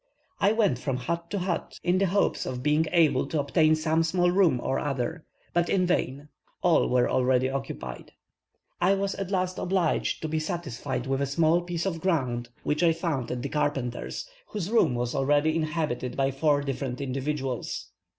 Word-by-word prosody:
I 200 +1 +4
went 210 - +2
from 130 -1 -2
hut 170 +6 -3
to 205 - -2
hut 180 -3 -3
in 180 +1 +2
the 195 - +3
hopes 200 +3 +1
of 125 -1 -4
being 150 +2 +2
able 150 -6 +3
to 155 - -1
obtain 155 +2 +3
some 160 +1 +1
small 175 +2 +2
room 180 -9 +3
or 135 - 0
other; 145 +3 -3 0.3
but 175 0 +2
in 185 -2 +2
vain, 145 -5 -1 0.4
all 175 -2 +4
were 125 -1 +3
already 130 0 +2
occupied. 135 - -6 0.7
I 190 +3 +4
was 195 0 -1
at 195 -2 -4
last 185 -1 -1
obliged 180 -4 0
to - - -1
be 155 0 -1
satisfied 135 -6 -3
with 135 +1 -1
a 140 - +1
small 160 +4 +3
piece 175 0 -3
of 165 -4 -2
ground, 125 -10 0
which 150 +1 0
I 170 -2 +5
found 160 -7 -2
at 125 -1 -3
a - - -2
carpenter's, 135 - -2 0.2
whose 205 -1 -4
room 230 - +3
was 120 0 -2
already 145 +3 +2
inhabited 155 -6 -2
by 135 0 +2
four 145 +1 +2
different 135 -2 -3
individuals. 135 -1 -3
155 Hz, 180 wpm, -27 LUFS, 135-175 Hz, 0.7 s, I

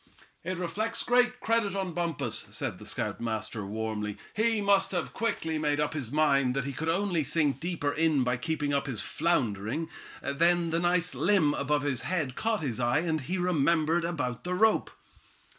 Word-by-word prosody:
"It 185 +1 -3
reflects 210 +6 -2
great 245 0 +3
credit 225 -3 +1
on 190 -3 -2
Bumpus," 170 -2 -2
said - - -4
the - - -8
scoutmaster, 110 -2 -3
warmly. 105 0 -3 0.2
"He 225 +1 +2
must 200 -1 +3
have 175 -2 -2
quickly 165 -9 -1
made 150 -1 +1
up 150 0 0
his 135 -7 -4
mind 140 -4 +3
that 135 -1 -1
he 140 - -3
could 160 +4 -3
only 175 -2 +1
sink 145 -1 +2
deeper 165 -3 -1
in 155 -4 +2
by 125 0 0
keeping 145 +2 -1
up 140 0 0
his 120 -6 -2
floundering. 130 - -1 0.3
Then 170 +4 +2
that 165 - +1
nice 175 0 +3
limb 170 -6 +3
above 145 0 0
his 140 -4 -1
head 160 -8 -1
caught 220 -3 0
his 125 -6 -2
eye, 120 +5 +2
and 160 -2 -1
he 175 +8 -3
remembered 170 -1 +2
about 135 -8 -2
the 180 0 -2
rope." 220 +3 +3
160 Hz, 175 wpm, -29 LUFS, 140-180 Hz, 0.3 s, great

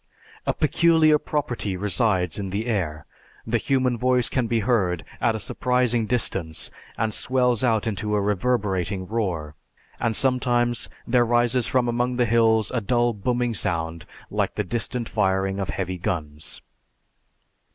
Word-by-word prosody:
A - - +2
peculiar 155 0 +4
property 120 -12 -2
resides 95 -3 0
in 100 -1 -3
the 100 +4 -2
air, 85 -10 -2 0.4
the 115 +1 +1
human 130 -1 +1
voice 125 -1 +2
can 125 -3 0
be 115 0 +1
heard 100 -7 +1
at 115 - +2
a - - -3
surprising 125 +1 +1
distance 95 -9 -2 0.3
and 110 -1 0
swells 125 -1 +1
out 115 -3 +2
into 105 -1 -1
a - - +2
reverberating 100 -3 0
roar, 90 -8 -2 0.5
and 115 -1 0
sometimes 120 -2 +1 0.2
there 120 0 +3
rises 120 +1 +2
from 125 -2 +2
among 120 +1 0
the 120 0 +2
hills 110 -1 +3
a 125 - -1
dull 120 +2 +2
booming 120 +3 -1
sound 85 -4 -2 0.2
like - - -1
the 105 - 0
distant 115 +4 -3
firing 95 -2 0
of 95 - -3
heavy 95 -1 -3
guns. 75 -4 -4
115 Hz, 145 wpm, -24 LUFS, 95-125 Hz, 0.5 s, peculiar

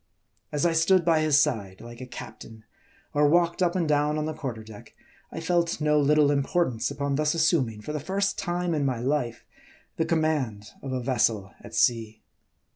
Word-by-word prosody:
As 150 +1 0
I 170 - +3
stood 170 +2 +3
by 165 -2 +4
his 155 -2 +4
side 100 -10 -1
like 120 +1 -11
a 130 - -7
captain, 110 -2 -10 0.5
or 145 0 +4
walked 170 +3 +2
up 175 -1 +2
and 175 -3 0
down 150 0 +1
on 155 - -1
the 155 - -3
quarter 120 -7 -6
deck, 110 -1 -13 0.4
I - - -5
felt 170 0 0
no 150 -1 +2
little 145 0 +4
importance 140 -3 0
upon 140 -1 -2
thus 150 +1 +1
assuming 150 -10 +1
for 150 - -6
the 150 - -2
first 195 +6 -1
time 175 0 -1
in 150 -2 0
my 130 -3 0
life, 125 -2 -2 0.5
the 160 - +1
command 150 -11 -1
of 135 - -6
a 130 -1 -2
vessel 110 -6 0
at - - -10
sea. 110 -2 +1
150 Hz, 190 wpm, -26 LUFS, 120-165 Hz, 0.5 s, by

